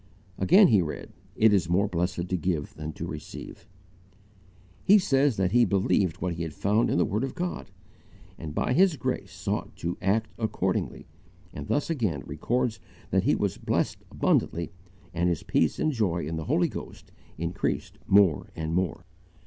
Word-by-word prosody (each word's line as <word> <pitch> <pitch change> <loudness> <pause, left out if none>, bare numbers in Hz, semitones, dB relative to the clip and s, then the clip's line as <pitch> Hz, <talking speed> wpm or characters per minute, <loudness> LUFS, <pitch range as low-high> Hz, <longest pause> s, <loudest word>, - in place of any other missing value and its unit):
Again 185 - +6
he 105 -5 +5
read: 80 -3 -5 0.2
"It 110 -1 +5
is 90 -5 +2
more 100 +4 +3
blessed 90 -1 -2
to 95 - +1
give 85 -4 -2
than 80 0 -6
to - - -5
receive." - - -8 1.2
He 205 - +7
says 140 - +2
that 95 -1 +1
he 120 +2 +5
BELIEVED 95 -4 +1
what 90 -2 -1
he 85 0 -3
found 105 +8 +1
in - - +1
the - - +3
word 105 +5 -1
of 135 - -4
God, 180 - -4 0.7
and 75 -1 -7
by - - +1
His 185 +2 +4
grace 120 - -3
sought - - -4
to 85 +1 -4
ACT 100 +4 +1
ACCORDINGLY, 100 -4 -1 0.5
and 70 -1 -7
thus 145 +3 0
again 105 - -1
records 110 - -1 0.3
that - - +2
he - - +4
was - - -1
blessed - - -1
abundantly 85 0 0 0.4
and 85 +1 +1
his 85 -3 -2
peace - - +1
and 155 - +1
joy 95 - 0
in 80 +2 -3
the 80 -1 -4
Holy - - +2
Ghost - - -9 0.3
increased 85 +2 -3
more 95 -8 +4
and 80 0 -3
more. 90 0 -1
95 Hz, 170 wpm, -27 LUFS, 85-115 Hz, 1.2 s, He